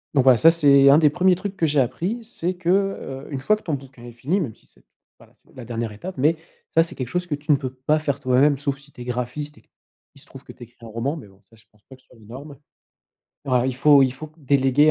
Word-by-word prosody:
Donc 135 - +4
voilà, 130 -2 +6
ça 165 - +7
c'est 140 -4 +5
un 140 - +7
des 155 -2 +5
1er 180 +3 +3
trucs 195 +2 -6
que 170 - +1
j'ai 145 -1 +1
appris 185 - -2
c'est 185 -5 -4
que, 175 -1 -3
heu, 185 -8 -1
une 140 - -3
fois 215 +11 +3
que 215 - -13
ton 160 - -3
bouquin 130 -3 -12
est 120 - -10
fini 135 - -2
même 135 - -4
si - - -29
c'est - - -27 0.4
voilà - - -20
c'est - - -27
la 125 - -9
dernière 115 -1 -4
étape, 175 - -9
mais 155 +5 +2 0.4
ça, 165 - +6
c'est 165 - -8
quelque 130 - -5
chose 180 +6 -2
que 160 - -3
tu 145 +2 -3
ne 145 - +5
peux 130 -2 -6
pas 130 +4 0
faire 140 -2 -2
toi-même 135 +2 +3
sauf 140 -1 -2
si 140 +1 -18
tu 125 - -13
es - - -5
graphiste 125 +5 -5
et - - -30 0.5
il 140 - -18
se - - -10
trouve 135 - -13
que - - -13
tu - - -25
écris 120 0 -17
un - - -9
roman 115 +8 -3
mais 135 - -11
bon 95 0 -23
ça 100 +4 -24
je 110 - -24
pense 105 -1 -31
pas 130 - -14
que 130 - -25
ce - - -33
soit 125 - -20
les 110 - -18
normes. 140 +6 -11 0.9
Bah 125 -2 +1
il 130 - -2
faut 145 +1 +6
il 130 -1 +1
faut 150 +4 -11
déléguer 140 +1 +3
140 Hz, 290 wpm, -22 LUFS, 125-155 Hz, 0.9 s, ça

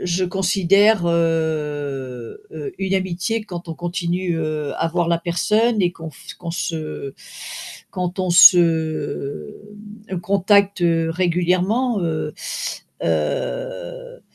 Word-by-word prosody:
je 180 +1 +1
considère, 195 +2 +3
heu 150 - -1
heu, 415 -1 -6
une 195 0 -1
amitié 190 +4 -1
quand 175 -3 -7
on 165 - -4
continue, 175 0 -2
heu, 155 -2 -2
à 165 - 0
voir 175 0 0
la 170 -1 +2
personne 210 +6 +1
et 175 -1 +2
qu'on 165 -1 -8
f 140 - -11
qu'on 170 -1 -5
se, 155 -5 -4 0.8
quand 180 0 -3
on 185 -1 0
se, 160 - +4 0.5
hem, 185 - -3
contacte, 200 +1 +3
heu, 165 -1 +2
régulièrement, 185 +7 +1
heu 155 -2 -2 0.7
heu, - - -3
175 Hz, 115 wpm, -21 LUFS, 160-195 Hz, 0.8 s, se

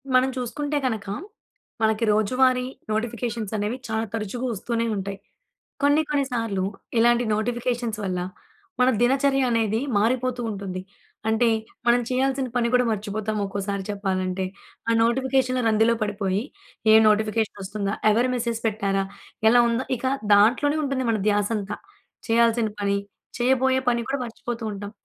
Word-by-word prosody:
మనం 255 +1 +5
చూసుకుంటే 290 +4 -2
కనక, 220 -5 -2 0.7
మనకి 220 +1 +2
రోజువారీ 250 +4 +2 0.3
నోటిఫికేషన్స్ 225 -1 -2
అనేవి 210 +4 -2
చాలా 220 0 -1
తరచుగా 225 +3 -3
వస్తూనే 230 +2 -2
ఉంటాయి. 195 0 -4 0.6
కొన్ని 290 +2 +5
కొన్ని 285 -2 +1
సార్లు 225 -6 -1 0.4
ఇలాంటి 240 +1 +4
నోటిఫికేషన్స్ 240 0 -2
వల్ల 185 -1 -1 0.6
మన 250 - +5
దినచర్య 270 +2 +3
అనేది 225 -1 +1 0.2
మారిపోతూ 250 +3 0
ఉంటుంది. 195 -2 -5 0.5
అంటే, 225 +2 +3 0.4
మనం 240 +1 +5
చేయాల్సిన 265 +1 0
పని 235 -1 +2
కూడా 250 0 +4
మర్చిపోతాం 215 +1 -3
ఒక్కోసారి 200 0 -3
చెప్పాలంటే. 190 -2 -1 0.4
ఆ - - +4
నోటిఫికేషన్‌ల 255 +1 +1
రందిలో 225 +1 +4
పడిపోయి, 200 -1 -1 0.5
ఏ - - +9
నోటిఫికేషన్ 215 0 +1
వస్తుందా, 200 +1 -3 0.2
ఎవరు 240 +4 +2
మెసేజ్ 235 -2 -1
పెట్టారా, 200 -2 0 0.5
ఎలా 240 +2 +6
ఉందా, 235 +3 -1
ఇక 250 - -6 0.3
దాంట్లోనే 250 +9 +4
ఉంటుంది 270 -2 -1
మన 220 - 0
ధ్యాస 205 0 +1
అంతా. 205 0 -5 0.5
చేయాల్సిన 230 -1 +3
పని, 200 0 +1 0.4
చేయబోయే 260 +1 +3
పని 235 -1 0
కూడా 275 +1 -1
మర్చిపోతూ 235 0 -6
ఉంటాం. 200 0 -7
230 Hz, 130 wpm, -24 LUFS, 205-250 Hz, 0.7 s, ఏ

